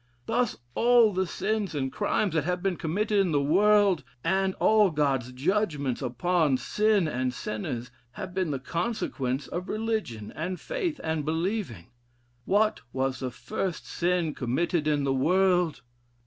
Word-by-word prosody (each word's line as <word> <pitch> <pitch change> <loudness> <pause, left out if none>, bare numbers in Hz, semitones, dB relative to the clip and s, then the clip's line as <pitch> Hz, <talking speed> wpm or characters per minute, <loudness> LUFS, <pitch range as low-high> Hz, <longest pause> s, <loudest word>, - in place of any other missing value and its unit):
Thus 240 0 0 0.2
all 235 - +5
the 190 0 0
sins 210 -3 -2
and 135 -2 -2
crimes 205 +1 0
that 160 -3 +1
have 180 +3 -2
been 195 -2 +1
committed 205 +6 0
in 190 -3 +2
the 145 - +3
world, 195 +4 +4 0.2
and 190 0 +1
all 215 -2 +4
God's 140 -5 0
judgments 145 - -1
upon 140 +3 +1
sin 210 - +2
and 130 -3 -1
sinners 120 +1 -5 0.2
have 190 -3 -7
been 185 -3 0
the 140 - -1
consequence 140 - -2
of 180 +1 -4
religion, 215 - -3
and 180 +3 -3
faith, 390 -12 -3
and 160 -2 -1
believing. 160 - -2 0.5
What 215 +2 +2
was 130 +1 -1
the 130 - -2
first 175 +8 -4
sin 175 -3 0
committed 155 +6 -1
in 145 -2 +2
the 135 -1 +1
world? 175 0 +2
175 Hz, 150 wpm, -27 LUFS, 140-205 Hz, 0.5 s, all